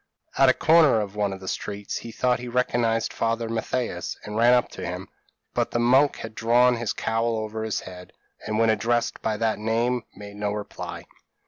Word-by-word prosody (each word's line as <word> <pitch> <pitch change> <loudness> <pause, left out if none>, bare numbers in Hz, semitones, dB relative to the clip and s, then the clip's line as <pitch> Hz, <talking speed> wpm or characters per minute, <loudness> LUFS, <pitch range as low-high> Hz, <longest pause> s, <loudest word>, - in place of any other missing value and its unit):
At 135 -1 +5
a 130 - +4
corner 160 -7 +5
of 105 -1 -4
one 105 -1 0
of 95 0 -7
the 95 - -9
streets, 100 +1 -4
he 115 - -7
thought 125 +2 +1
he 125 - -7
recognised 120 -2 0
Father 115 0 -1
Mathias, 115 +2 -3
and 105 - -7
ran 120 +2 +5
up 125 - +2
to - - -8
him; 90 +2 -5 0.4
but - - 0
the - - -2
monk 130 +4 +4
had 115 -1 -8
drawn 120 +2 +3
his 115 -2 -2
cowl 115 +1 -1
over 110 0 -4
his 110 -1 -2
head, 90 -1 -11 0.4
and 110 0 -1
when 115 0 +4
addressed 120 +2 0
by 110 -1 -1
that 110 -1 0
name, 115 +3 0
made 100 0 -10
no 105 0 -1
reply. 105 -1 -6
115 Hz, 200 wpm, -25 LUFS, 105-120 Hz, 0.4 s, At